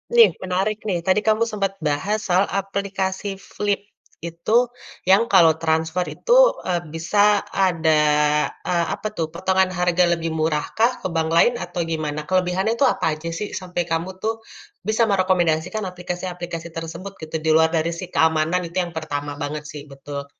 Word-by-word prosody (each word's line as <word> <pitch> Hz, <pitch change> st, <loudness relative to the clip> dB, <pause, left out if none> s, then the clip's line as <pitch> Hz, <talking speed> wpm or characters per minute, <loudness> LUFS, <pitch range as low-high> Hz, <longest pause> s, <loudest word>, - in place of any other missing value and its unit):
Nih 465 Hz, -1 st, +9 dB, 0.2 s
menarik 190 Hz, +3 st, -1 dB
nih, 180 Hz, -4 st, 0 dB
tadi 190 Hz, +2 st, +4 dB
kamu 220 Hz, +1 st, +4 dB
sempet 200 Hz, -2 st, -1 dB, 0.2 s
bahas 190 Hz, +9 st, 0 dB
soal 185 Hz, +2 st, +3 dB
aplikasi 195 Hz, 0 st, -2 dB
Flip, 205 Hz, +1 st, -2 dB, 0.5 s
itu 170 Hz, +4 st, -5 dB, 0.6 s
yang 195 Hz, +4 st, +6 dB
kalau 165 Hz, -5 st, +7 dB
transfer 160 Hz, +2 st, 0 dB
itu, 485 Hz, -, +1 dB, 0.3 s
eee, 175 Hz, -2 st, 0 dB
bisa 205 Hz, +5 st, +3 dB
ada, 165 Hz, -5 st, +2 dB, 0.7 s
eee, 170 Hz, -1 st, +2 dB
apa 215 Hz, -, -4 dB
tuh, 160 Hz, -, 0 dB
potongan 190 Hz, +2 st, +1 dB
harga 180 Hz, 0 st, +2 dB
lebih 165 Hz, 0 st, -3 dB
murahkah 160 Hz, +9 st, +1 dB
ke -, -, -2 dB
bank 160 Hz, -1 st, +1 dB
lain 240 Hz, -, +5 dB
atau 175 Hz, 0 st, -6 dB
gimana? 155 Hz, -2 st, -2 dB
Kelebihannya 185 Hz, +3 st, +1 dB
itu 280 Hz, -, +2 dB
apa -, -, -3 dB
aja 155 Hz, +2 st, -6 dB
sih 210 Hz, -, -3 dB
sampai 180 Hz, -1 st, -3 dB
kamu 165 Hz, +3 st, -1 dB
tuh 220 Hz, +1 st, 0 dB, 0.5 s
bisa 220 Hz, +2 st, +2 dB
merekomendasikan 185 Hz, 0 st, +1 dB
aplikasi-aplikasi 175 Hz, -1 st, -6 dB
tersebut 165 Hz, +4 st, -6 dB
gitu, 160 Hz, 0 st, -7 dB
di 160 Hz, -, +2 dB
luar 160 Hz, 0 st, +5 dB
dari 165 Hz, +1 st, +1 dB
si 185 Hz, -, -4 dB
keamanan 160 Hz, +2 st, +2 dB
itu 170 Hz, -, -8 dB
yang 175 Hz, -, -7 dB
pertama 145 Hz, -2 st, -4 dB
banget 150 Hz, +1 st, -4 dB
sih, 150 Hz, -, -8 dB
betul. 140 Hz, +1 st, -7 dB
180 Hz, 160 wpm, -22 LUFS, 160-195 Hz, 0.7 s, Nih